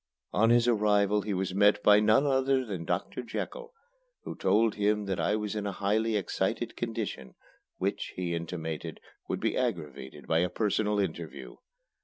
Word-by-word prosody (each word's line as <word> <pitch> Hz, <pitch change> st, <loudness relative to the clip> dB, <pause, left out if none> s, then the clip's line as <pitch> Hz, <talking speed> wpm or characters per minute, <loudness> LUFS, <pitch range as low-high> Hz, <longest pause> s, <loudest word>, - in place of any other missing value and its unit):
On 110 Hz, +2 st, +4 dB
his 120 Hz, 0 st, +4 dB
arrival 105 Hz, -2 st, +3 dB
he 105 Hz, 0 st, -3 dB
was 95 Hz, 0 st, -2 dB
met 105 Hz, +1 st, +4 dB
by 105 Hz, 0 st, +7 dB
none 110 Hz, +6 st, +4 dB
other 135 Hz, -1 st, +2 dB
than 95 Hz, -7 st, -5 dB
Doctor 90 Hz, +8 st, -2 dB
Jekyll, 470 Hz, -, -6 dB, 0.5 s
who -, -, -5 dB
told 105 Hz, +3 st, +2 dB
him 105 Hz, 0 st, +1 dB
that 95 Hz, -2 st, -2 dB
I 105 Hz, -, +1 dB
was 105 Hz, 0 st, -3 dB
in 105 Hz, -1 st, -2 dB
a -, -, -1 dB
highly 105 Hz, +4 st, 0 dB
excited 105 Hz, +3 st, -1 dB
condition, 110 Hz, -, -4 dB, 0.4 s
which, -, -, -2 dB
he 90 Hz, -2 st, -2 dB
intimated, 80 Hz, -1 st, -5 dB, 0.3 s
would -, -, -1 dB
be -, -, 0 dB
aggravated 75 Hz, -5 st, -4 dB
by 80 Hz, -, +2 dB
a 90 Hz, +1 st, +1 dB
personal 105 Hz, +2 st, 0 dB
interview. 100 Hz, -, -4 dB
105 Hz, 165 wpm, -29 LUFS, 95-110 Hz, 0.5 s, by